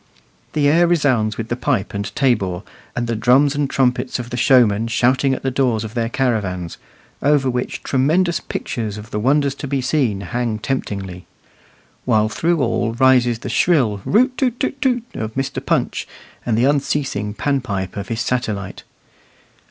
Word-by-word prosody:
The 145 -2 +2
air 170 +4 +4
resounds 130 -11 +1
with 115 0 -5
the 120 - 0
pipe 125 -5 -1
and 100 0 -3
tabor, 100 -9 +1 0.3
and 120 - -1
the 115 0 -2
drums 130 +6 +4
and 145 -1 -1
trumpets 125 -1 0
of 120 -1 -7
the - - -2
showmen 115 -4 +4
shouting 130 +4 +2
at - - -8
the 135 - 0
doors 125 -4 +1
of 110 -1 -7
their 115 -1 -1
caravans, 100 -10 -2 0.4
over 140 -2 +2
which 125 0 -3
tremendous 165 +7 +1
pictures 110 -4 -4
of 105 +2 -10
the 105 - -2
wonders 140 +4 +2
to 140 - -7
be 135 0 -1
seen 130 -5 0
within 95 -3 -8
hang 120 -3 -1
temptingly; 100 -7 -4 0.8
while 110 -3 +2
through 160 +6 0
all 115 -1 0
rises 125 -2 +4
the 120 - -7
shrill 125 - +2
"root 255 +5 +2
too 265 - +3
too 245 +1 -2
too" 250 -4 +1
of 110 0 -5
Mr. 135 0 -3
Punch, - - -1 0.4
and 110 -2 +1
the 120 - +3
unceasing 135 -7 0
pan 140 +1 0
pipe 100 -6 -4
of 100 -1 -5
his 115 +2 -2
satellite. 110 -7 -2
125 Hz, 175 wpm, -19 LUFS, 110-140 Hz, 0.8 s, air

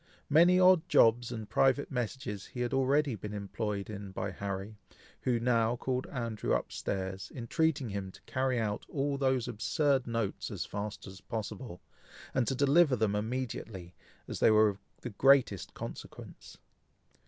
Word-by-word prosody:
Many 175 +4 +6
odd 185 -3 +5
jobs 120 +1 +4
and 110 -3 -5
private 135 +4 +2
messages 120 -5 -4
he 125 - -6
had 120 +2 -1
already 135 +1 +2
been 105 0 -6
employed 100 0 -3
in 100 -2 -7
by - - -3
Harry, 100 +1 -5 0.5
who 120 -2 +1
now 115 -1 +2
called 130 +1 -2
Andrew 115 -5 -2
up - - -2
stairs, 95 -1 -4
entreating 140 +2 0
him 100 -2 -4
to - - -15
carry 130 -1 0
out 105 -2 -2
all 140 0 -1
those 130 -3 +1
absurd 135 +4 +1
notes 115 -4 -2
as - - -4
fast 105 +1 -5
as 95 0 -11
possible, 110 -3 -6 0.5
and 130 -3 +1
to 135 - 0
deliver 140 +2 +4
them 110 -3 +1
immediately, 110 -5 -4 0.3
as - - -5
they - - +5
were 110 0 +6
of 100 -1 -6 0.2
the 120 - -5
greatest 130 -3 +3
consequence. - - -9
115 Hz, 155 wpm, -31 LUFS, 105-135 Hz, 0.5 s, Many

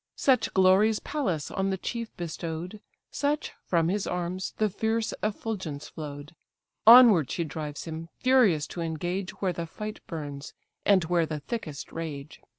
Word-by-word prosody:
Such 255 -5 +3
glories 190 +3 +5
Pallas 185 - -2
on 195 0 -1
the 190 - -1
chief 230 +4 -4
bestow'd, 170 +3 -5 0.3
Such, 290 +1 -1 0.2
from 165 -2 +2
his 200 +3 -1
arms, 180 +1 -3
the 215 - +2
fierce 220 +2 -1
effulgence 200 -8 -3
flow'd: 145 0 -8 0.5
Onward 225 - +9
she 170 - -1
drives 150 -2 -5
him, 165 0 -6
furious 235 - +4
to 175 - -5
engage, 175 +4 -2
Where 185 -2 +1
the 170 0 -4
fight 210 +5 -6
burns, 145 -4 -6 0.3
and 195 -3 +5
where 170 -1 +1
the 155 -1 -4
thickest 155 -4 -5
rage. 155 -3 -6
180 Hz, 150 wpm, -27 LUFS, 160-215 Hz, 0.5 s, Onward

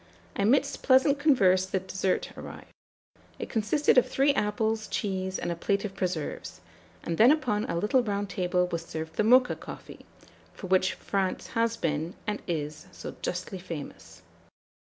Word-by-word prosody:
Amidst 270 +8 +2
pleasant 275 +2 +4
converse 190 -11 +4
the 190 - -1
dessert 190 0 -2
arrived. - - -10 0.7
It - - -6
consisted 245 +5 +3
of - - -2
three 280 +1 +3
apples, 220 -1 0
cheese, 190 -2 -2
and - - -3
a - - -2
plate 200 +4 -1
of 195 - -5
preserves; 175 -5 -4 0.4
and 165 - -3
then 230 +3 +8
upon 255 -9 +1
a 170 - -2
little 210 +8 +2
round 205 -3 -2
table 180 -2 0
was 170 -2 -4
served 160 -1 -7
the - - +3
Mocha 250 +3 +5
coffee, - - -11 0.5
for - - -8
which 185 0 +2
France 195 -2 -2
has 230 -1 0
been, 160 +1 -2
and 210 -1 -2
is, 150 -2 -4
so - - -8
justly 185 +1 -4
famous. 165 -5 -9
195 Hz, 155 wpm, -28 LUFS, 180-230 Hz, 0.7 s, then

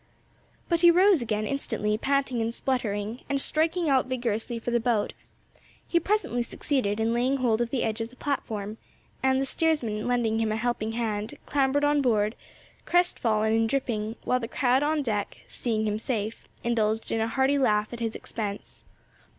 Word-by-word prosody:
But 340 -2 +1
he 345 - +8
rose 365 -1 +5
again 215 -2 -1
instantly 215 -5 -1
panting 265 0 0
and 225 +1 0
spluttering, 230 -3 -2
and 280 0 +1
striking 320 +4 +1
out 265 -3 +3
vigorously 235 -2 -2
for 230 +1 -3
the 235 - +3
boat; 225 -3 0 0.7
he 340 - +3
presently 400 - 0
succeeded 235 -3 -1
in 225 +1 +1
laying 255 +3 +1
hold 240 -3 +1
of 240 - 0
the 255 0 -1
edge 220 +1 -1
of 225 - -3
the 255 - -18
platform, 220 -7 -3 0.4
and, 265 0 +3
the 270 - 0
steersman 255 -9 0
lending 235 -3 +1
him 220 -1 +1
a - - 0
helping 225 -1 -1
hand, 220 -2 -2
clambered 280 0 +1
on 290 0 +3
board, 215 -4 +2 0.5
crestfallen 220 -11 +2
and 225 0 +2
dripping, 225 -4 -1
while 250 - +1
the 230 - -4
crowd 255 +2 +2
on 300 0 +1
deck, 210 -5 -2
seeing 220 -3 -1
him 210 0 -1
safe, 220 -2 -3 0.2
indulged 225 -2 0
in 225 - +1
a 225 - +1
hearty 265 +4 +2
laugh 215 -3 +2
at 240 - -6
his 225 -1 -2
expense. 205 -3 -6
235 Hz, 175 wpm, -27 LUFS, 220-270 Hz, 0.7 s, he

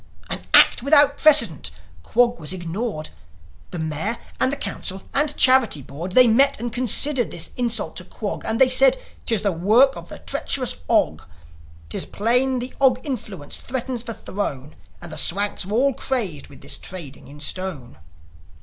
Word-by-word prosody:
An - - -2
act - - +6
without 285 +1 +4
precedent! 230 - +4 0.3
Quog 240 - +1
was 155 +3 -3
ignored! 175 -1 -5 0.6
The - - -7
Mayor 160 +8 -3 0.2
and 275 +2 0
Council 190 -1 -5
and 295 +1 +2
Charity 255 - +4
Board, 165 +8 -8
They 255 +3 +8
met 270 +4 +3
and 235 0 -5
considered 255 +1 +2
this 160 -1 -2
insult 240 -2 -2
to - - -4
Quog; - - -6
And 220 0 -1
they 265 - +6
said, 265 0 +5
" - - -28
'Tis 220 -3 +1
the 200 - +1
work 220 +11 +3
of - - -10
the - - -8
treacherous 255 -3 -3
Og! - - +1 0.7
'Tis - - -3
plain 250 +5 +1
the 250 +1 -4
Og 255 -2 +4
influence 210 - -6
threatens 255 -1 -4
the 230 -2 -5
Throne; 150 -10 -5 0.2
And 175 -1 -10
the 155 - -1
Swanks 200 +2 0
are - - -7
all 265 +5 +2
crazed 225 - -2
with - - -16
this - - -1
trading 165 -7 -9
in 145 +1 -13
stone." 150 - -3
225 Hz, 170 wpm, -21 LUFS, 175-255 Hz, 0.7 s, They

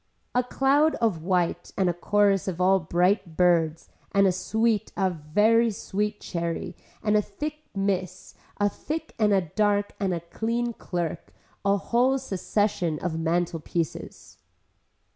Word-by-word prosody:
A 250 - +3
cloud 275 +5 +2
of 215 -9 0
white 175 0 0
and 190 - +2
a 175 - +2
chorus 200 +2 +2
of 185 -2 -3
all 190 +1 +4
bright 175 +1 +1
birds 165 -3 +2 0.3
and 200 -1 +5
a 190 - +4
sweet 220 +3 0
a 190 -2 +2
very 210 +9 +3
sweet 210 0 -3
cherry 170 -1 -4 0.3
and 210 -1 +2
a 210 - +5
thick 295 +10 -6 0.2
miss, 185 -2 -2 0.2
a 205 - +3
thick 315 +9 -5
and 210 -1 +3
a 195 -1 +4
dark 205 +4 0
and 195 -2 0
a 175 - -1
clean 230 +7 -2
clerk, 175 -5 -4 0.3
a 200 0 +3
whole 250 +6 +2
succession 200 - -1
of 165 0 -3
mantle 170 0 0
pieces. 165 0 -5
195 Hz, 145 wpm, -26 LUFS, 175-215 Hz, 0.3 s, and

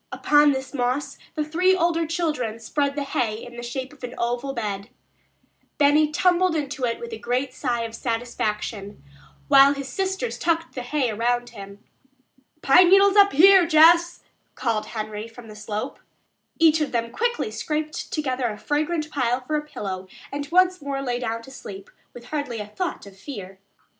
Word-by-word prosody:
Upon 295 0 +4
this 265 0 -4
moss 255 +2 -2 0.2
the 305 - 0
three 360 +5 +2
older 335 -2 +1
children 300 -9 -2
spread 280 +5 -2
the 290 - -2
hay 240 -5 -1
in 240 0 -11
the 240 - -7
shape 260 +3 -5
of 275 - -19
an 250 0 -6
oval 245 +3 -2
bed. 205 -5 -4 0.9
Benny 295 +1 +4
tumbled 360 +1 +2
into 280 -4 -2
it 230 -1 -2
with 235 -1 -7
a 220 - -6
great 250 +3 -2
sigh 245 -3 -2
of 225 -1 -6
satisfaction, 215 - -3 0.4
while 275 0 +7
his 275 -1 -6
sisters 385 - -3
tucked 330 -1 0
the 255 - -5
hay 250 -1 -1
around 240 +3 -1
him. 200 -2 -11 0.8
"Pine 345 +6 +6
needles 395 +1 +6
up 400 -1 +6
here, 370 +3 +7
Jess," 335 +2 +5 0.3
called 225 -4 -1
Henry 215 0 -5
from 230 0 -13
the 215 - -10
slope. 215 +4 -5 0.6
Each 320 -1 +4
of 300 - -1
them 230 -1 -2
quickly 475 - -1
scraped 305 0 -4
together 260 -4 -1
a 210 -2 -5
fragrant 305 +5 -2
pile 250 -2 0
for 305 +5 -3
a 300 - -1
pillow 190 -8 -6 0.2
and 285 0 -5
once 365 0 +3
more 275 -1 -3
lay 245 -2 -2
down 230 -1 -3
to 265 - -13
sleep, 195 -7 -10 0.2
with 240 -1 -11
hardly 285 -3 -4
a 210 - -4
thought 340 - -5
of 200 -1 -13
fear. 195 -4 -9
265 Hz, 175 wpm, -24 LUFS, 230-310 Hz, 0.9 s, while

